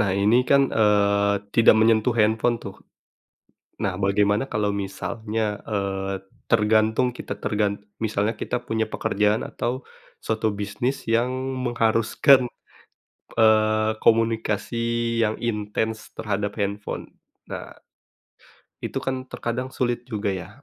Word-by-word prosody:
Nah 100 -2 +2
ini 105 +6 +3
kan, 140 +1 +4
eee, 100 -1 +3 0.2
tidak 115 -2 +7
menyentuh 110 +1 +4
handphone 110 +2 +2
tuh, 100 -3 -8 1.1
nah 95 -1 -1
bagaimana 100 +4 +2
kalau 105 -5 -1
misalnya, 105 +2 -3
eee, 100 -2 -2 0.3
tergantung 110 +2 +3
kita 125 - -6
tergan 105 -1 0 0.2
misalnya 110 0 -1
kita 125 - -3
punya 110 0 -1
pekerjaan 105 +2 0
atau 125 +3 -3 0.4
suatu 110 -1 -1
bisnis 105 +6 -2
yang 120 +2 +2 0.4
mengharuskan, 120 +3 +4 0.9
eee, 110 -1 +4
komunikasi 115 +1 +1
yang 110 - -1
intens 110 0 -3
terhadap 105 -1 -2
handphone. 100 +1 -4 0.4
Nah - - -8 1.0
itu - - -5
kan 130 -1 -3
terkadang 125 +2 -3
sulit 120 0 -1
juga 105 -4 -2
ya, 95 -1 -5
110 Hz, 110 wpm, -24 LUFS, 105-115 Hz, 1.1 s, tidak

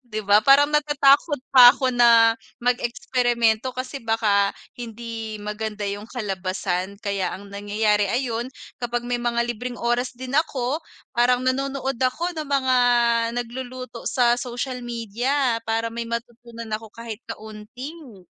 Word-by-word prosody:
'Di 215 -4 -6
ba, 205 +1 +5
parang 280 +5 +5
natatakot 295 0 +3 0.2
pa 250 -2 +10
ako 260 -2 0
na 230 -2 +6 0.3
mag-eksperimento 245 -1 +1
kasi 255 +2 -5
baka 210 -3 +1 0.2
hindi 230 -2 -7
maganda 210 0 -4
'yung 205 +2 -5
kalabasan. 190 -3 -3
Kaya 200 -3 -2
ang 200 +1 -13
nangyayari 205 0 +1
ayun 240 +1 -1 0.3
kapag 240 0 -2
may 245 0 -2
mga 235 0 0
libreng 245 +2 -6
oras 240 +1 -1
din 255 +1 -7
ako 280 -1 0 0.3
parang 245 +1 +2
nanonood 270 -1 -1
ako 330 +8 0
ng 300 - -6
mga 260 -2 +2 0.6
nagluluto 245 0 -5
sa 240 -2 +3
social 250 +1 -4
media 240 +2 -1
para 225 0 -1
may 235 0 -5
matutunan 235 -1 -7
ako 220 +1 -4
kahit 230 0 -8
kaunting 220 - -9
235 Hz, 130 wpm, -23 LUFS, 220-255 Hz, 0.6 s, pa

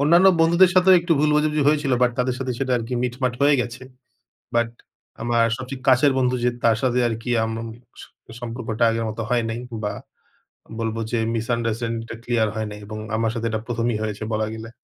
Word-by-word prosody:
অন্যান্য 170 +6 +5
বন্ধুদের 170 +3 +5
সাথেও 185 +1 +6
একটু 170 0 +1
ভুল 150 0 +3
বোঝাবুঝি 150 0 +2
হয়েছিল, 145 -3 +1
বাট 125 - +4
তাদের 125 0 +1
সাথে 130 -1 -2
সেটা 130 -1 -1
আরকি 115 +2 -4
মিটমাট 125 0 -1
হয়ে 145 0 +5
গেছে। 120 +1 -5 0.7
বাট 120 0 +2 0.5
আমার 120 0 +2
সবচেয়ে 130 0 -7
কাছের 130 +2 +5
বন্ধু 125 -1 +2
যে, 125 - +4 0.2
তার 115 -2 +4
সাথে 125 -1 +1
আরকি 115 +2 -4
আম 110 - -3
আম 115 - -6 0.3
স - - -10 0.4
সম্পর্কটা 115 -1 -2
আগের 115 0 -1
মত 110 +1 -6
হয় 120 -1 +2
নাই। 115 +2 -4 0.2
বা 105 - -1 0.9
বলব 115 -1 -2 0.2
যে 120 - +1 0.2
misunderstanding 115 0 -2
টা - - -5
ক্লিয়ার 120 -3 +1
হয় 110 -1 -2
নাই। 105 - -8
এবং 110 +1 -7 0.2
আমার 115 0 0
সাথে 115 -1 -4
এটা 110 - -2
প্রথমই 115 -1 -1
হয়েছে 105 0 -4
বলা 110 0 0
গেলে। 110 0 -8
120 Hz, 195 wpm, -22 LUFS, 115-130 Hz, 0.9 s, সাথেও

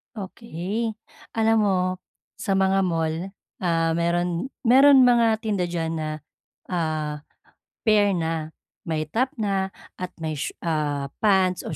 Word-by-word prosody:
Okey. 210 +2 -4 0.4
Alam 225 0 +3
mo, 190 -2 +2 0.6
sa 195 - -1
mga 195 0 +3
mall, 165 +2 -2 0.2
ah, 165 -2 +1
mayro'n 170 +2 0 0.2
mayro'n 270 +2 +7
mga 230 -3 +4
tinda 205 -5 0
diyan 165 -2 -2
na, 155 0 -3 0.6
ah, 155 -4 -2 0.6
pair 205 -3 +4
na. 160 -1 -3 0.3
May 155 -1 0
top 245 - 0
na 195 -3 -1 0.3
at 180 -1 -5
may 155 -1 -1
shoe - - -3
ah, 145 -4 -1
pants 190 -4 +3
o 155 - -4
180 Hz, 130 wpm, -24 LUFS, 165-215 Hz, 0.6 s, mayro'n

